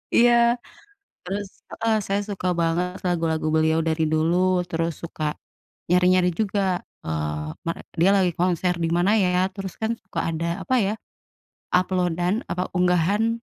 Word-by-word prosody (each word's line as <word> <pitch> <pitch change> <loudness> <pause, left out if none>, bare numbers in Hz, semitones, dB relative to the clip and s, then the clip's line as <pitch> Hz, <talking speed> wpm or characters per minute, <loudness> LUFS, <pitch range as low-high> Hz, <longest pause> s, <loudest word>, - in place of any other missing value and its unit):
iya. 240 0 +6 0.9
Terus 200 +2 -3 0.2
heeh, 225 -1 0
saya 200 +1 0
suka 190 -2 -3
banget 175 +2 0
lagu-lagu 165 -2 0
beliau 160 +1 +3
dari 160 0 +1
dulu. 160 +2 +2 0.3
Terus 165 0 -1
suka 160 -2 -6 0.7
nyari-nyari 180 0 +4
juga, 195 -3 0 0.2
eee, 75 -1 -3
mere 165 - -3 0.2
dia 190 - +6
lagi 180 -2 +2
konser 180 0 +1
di 165 - +1
mana 180 +4 +3
ya. 180 0 +2
Terus 195 -2 -5
kan 220 +1 0
suka 190 - -5
ada 165 +1 -2 0.2
apa 260 - +1
ya, 205 - 0 0.8
upload-an 180 0 +1 0.2
apa, 180 +1 -2
unggahan 200 +6 +2
180 Hz, 140 wpm, -24 LUFS, 165-195 Hz, 0.9 s, iya